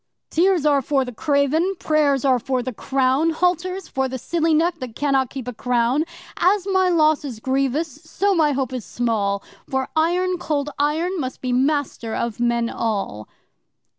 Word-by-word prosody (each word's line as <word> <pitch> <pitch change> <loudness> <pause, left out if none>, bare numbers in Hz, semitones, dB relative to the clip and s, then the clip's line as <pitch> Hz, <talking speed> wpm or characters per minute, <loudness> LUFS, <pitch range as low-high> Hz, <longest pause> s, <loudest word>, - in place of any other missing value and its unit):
'Tears 355 -2 +3
are 285 -2 +4
for 270 0 +1
the 250 - -7
craven, 300 - +1
prayers 290 -5 +1
are 260 -2 +4
for 255 +1 -1
the 255 0 -4
clown 265 +6 +1
Halters 360 +2 0
for 265 0 -1
the 260 0 -4
silly 330 +5 0
neck 330 +2 +2
that 250 -4 -7
cannot 270 -3 +1
keep 260 -3 -7
a 250 - -4
crown.' 245 +5 +1 0.3
'As 380 +2 +2
my 375 -2 +2
loss 310 -3 +3
is 250 -6 -6
grievous, 270 +4 -1
so 400 0 0
my 315 -4 +3
hope 265 -2 -2
is 250 -3 -4
small, 205 -5 -1 0.3
For 265 -1 -1
Iron 355 +3 +1
Cold 295 -3 -2
Iron 325 +6 0
must 260 -3 -4
be 255 -1 -2
master 265 -4 0
of 235 -2 -3
men 235 -1 +1
all! 200 - -3
280 Hz, 170 wpm, -22 LUFS, 250-325 Hz, 0.3 s, are